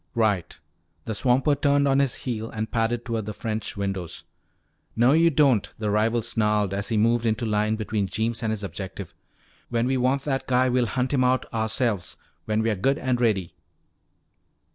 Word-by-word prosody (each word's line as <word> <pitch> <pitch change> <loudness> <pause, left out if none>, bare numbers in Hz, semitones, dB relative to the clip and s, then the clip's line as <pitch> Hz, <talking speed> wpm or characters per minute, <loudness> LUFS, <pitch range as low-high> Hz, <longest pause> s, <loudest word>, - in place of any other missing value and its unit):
"Right." 105 -6 0 0.5
The 110 - -3
swamper 130 +6 +2
turned 140 0 +2
on 135 0 +3
his 140 -3 +1
heel 115 -3 -4
and 110 0 -4
padded 115 +1 0
toward 115 -3 -3
the 105 - -3
French 110 -2 -4
windows. 95 -4 -4 0.7
"No, 120 +3 +4
you 165 +3 +5
don't!" 130 -9 +3
the 105 -1 -2
rival 110 +2 +1
snarled 105 -3 0
as 100 0 -2
he 110 - 0
moved 115 +2 +3
into 115 +1 0
line 105 0 +1
between 110 -2 -2
Jeems 110 +5 -2
and 110 -2 -1
his 105 -2 -3
objective. 95 0 -6 0.6
"When 115 0 0
we 130 +1 +1
want 130 +2 +1
that 135 -2 -2
guy, 130 0 +3
we'll 125 -1 +2
hunt 130 +4 -1
him 130 -2 +3
out 125 0 +2
ourselves. 110 - -1 0.3
When 110 0 0
we're 110 -2 0
good 135 +8 +1
and 125 -2 -1
ready!" 95 -7 +1
115 Hz, 180 wpm, -25 LUFS, 105-125 Hz, 0.7 s, you